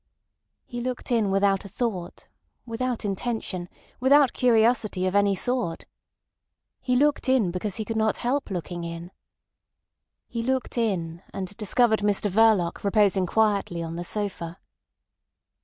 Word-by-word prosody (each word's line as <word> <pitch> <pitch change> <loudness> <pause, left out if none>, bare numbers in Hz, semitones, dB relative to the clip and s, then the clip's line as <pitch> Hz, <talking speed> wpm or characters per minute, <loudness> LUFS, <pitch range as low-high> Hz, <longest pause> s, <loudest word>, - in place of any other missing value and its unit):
He 240 -1 -6
looked 250 +1 -4
in 225 -4 +2
without 195 0 +2
a 200 - -10
thought, 195 -5 -4 0.4
without 245 0 -3
intention, 195 -3 -3 0.3
without 275 +1 +5
curiosity 225 -5 +2
of 185 - 0
any 200 -1 +3
sort. 240 -4 -1 0.9
He 250 - 0
looked 285 0 +2
in 240 -9 +3
because 185 +2 -3
he 220 - -3
could 225 0 -3
not 220 0 +1
help 270 +4 -1
looking 175 -2 -4
in. 170 +1 -7 1.2
He 230 - -4
looked 260 +2 -1
in, 175 -8 -1
and 190 +1 -5
discovered 220 +1 +2
Mr 205 0 +1
Verloc 210 -4 +3
reposing 200 -2 +3
quietly 200 -5 +1
on 165 0 -5
the 175 - -4
sofa. 185 -3 -4
210 Hz, 135 wpm, -25 LUFS, 185-240 Hz, 1.2 s, without